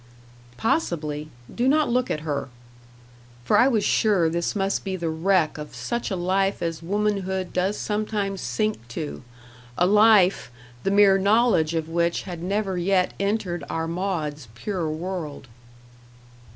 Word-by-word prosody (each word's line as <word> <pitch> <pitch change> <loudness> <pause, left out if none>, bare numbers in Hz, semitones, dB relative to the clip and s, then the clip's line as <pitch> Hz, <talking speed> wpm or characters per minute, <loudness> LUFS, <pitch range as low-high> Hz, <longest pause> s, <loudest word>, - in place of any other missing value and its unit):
"Possibly. 155 - -1 0.2
Do 245 +2 0
not 300 +2 +3
look 250 +1 0
at 150 - -2
her." 145 -3 -3 1.0
For - - +3
I 250 - +6
was 225 -6 +2
sure 195 -7 +3
this 170 +3 -1
must 195 -1 0
be 190 -1 -3
the 170 -3 -2
wreck 160 -1 +1
of 150 0 -8
such 235 0 -3
a 195 - -1
life 190 +2 0
as 165 -1 -3
womanhood 190 -1 -1
does 190 +3 0
sometimes 210 -2 -2
sink 215 - -2
to 145 +5 -6 0.6
a 175 - +4
life, 205 - +5 0.3
the - - 0
mere 200 -1 +5
knowledge 200 -6 +3
of 160 -1 -1
which 170 +1 0
had 175 -3 -7
never 195 0 -1
yet 185 +1 +1
entered 200 -4 -1
our 165 0 -2
Maud's 165 -6 -3
pure 175 - -3
world. 155 -4 -5
185 Hz, 145 wpm, -24 LUFS, 165-205 Hz, 1.0 s, I